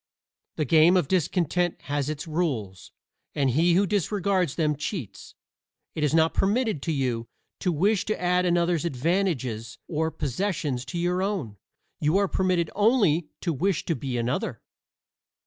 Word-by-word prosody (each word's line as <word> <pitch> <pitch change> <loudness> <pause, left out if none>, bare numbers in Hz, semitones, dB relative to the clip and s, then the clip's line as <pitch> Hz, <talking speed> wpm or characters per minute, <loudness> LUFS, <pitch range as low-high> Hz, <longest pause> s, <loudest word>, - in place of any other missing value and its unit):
The 155 - -1
game 165 +6 +5
of 175 -6 +1
discontent 175 0 0
has 145 0 -2
its 155 +2 -4
rules, 135 - -3 0.4
and 135 -3 +2
he 170 +6 +3
who 200 +3 +4
disregards 195 -4 0
them 155 -3 +1
cheats. 150 - -6 0.6
It 155 - -3
is 150 - +2
not 160 +1 +3
permitted 215 - +1
to 165 - -2
you 125 -5 -1 0.3
to 180 - 0
wish 195 +6 +1
to 215 - -2
add 180 0 +2
another's 175 -2 +1
advantages 135 - -1
or 160 0 -1
possessions 145 - -2
to 140 +6 -5
your 175 +2 0
own; 185 - -2 0.4
you 155 +5 +2
are 200 0 +2
permitted 180 -3 0
only 205 - +3
to 170 - -1
wish 185 +5 0
to 165 - 0
be 130 -1 -3
another. 120 +2 -2
165 Hz, 150 wpm, -26 LUFS, 140-185 Hz, 0.6 s, game